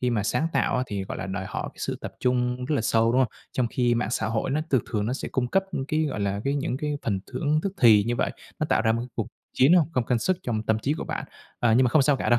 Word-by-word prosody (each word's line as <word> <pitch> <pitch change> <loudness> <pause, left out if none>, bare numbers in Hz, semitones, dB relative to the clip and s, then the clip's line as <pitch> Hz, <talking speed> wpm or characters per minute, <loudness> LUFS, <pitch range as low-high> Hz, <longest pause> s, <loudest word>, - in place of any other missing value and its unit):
khi 125 - +1
mà 110 -4 +1
sáng 150 +10 0
tạo - - +1
á, 125 - +1
thì, 100 -4 -3
gọi - - -6
là, 95 - -4
đòi 95 0 -4
hỏi - - -4
cái - - -24
sự - - -3
tập - - -6
trung 125 0 0
rất 150 - 0
là 135 - +1
sâu, 115 +1 +3
đúng 130 - +3
không? 130 - +1 0.2
Trong 125 - +1
khi 120 -1 +2
mạng 115 -1 -1
xã 110 -2 0
hội 110 +3 -1
nó 145 +3 +1
thường 130 -5 +3
thường 105 -1 0
nó 120 - -1
sẽ 130 - -4
cung 130 -2 -1
cấp 195 +8 +2 0.2
cái, 155 +1 +1
gọi 140 -8 -3
là, 100 0 -1
cái 140 +1 +1
những 135 -3 -1
cái 150 +1 -2
phần 100 -4 -1
thưởng 150 +4 +1
tức 195 - -2
thì 110 -4 +7
như 120 +2 -1
vậy, - - 0 0.3
nó 155 - 0
tạo - - +2
ra 110 -1 +3
một 115 - -1
cái 120 - -6
cuộc 115 - -2 0.3
chiến 135 +5 +5 0.2
không 125 - +1
không 125 - +2
sức 185 +10 +1
trong 110 -3 -2
tâm 110 0 +1
trí 140 +6 0
của - - -4
bạn. - - -4 0.4
À, 120 -2 +3
nhưng 130 - +5
mà - - +3
không 150 +2 +5
sao 145 0 +3
cả - - -2
đâu, 120 - +5
125 Hz, 315 wpm, -26 LUFS, 110-135 Hz, 0.4 s, thì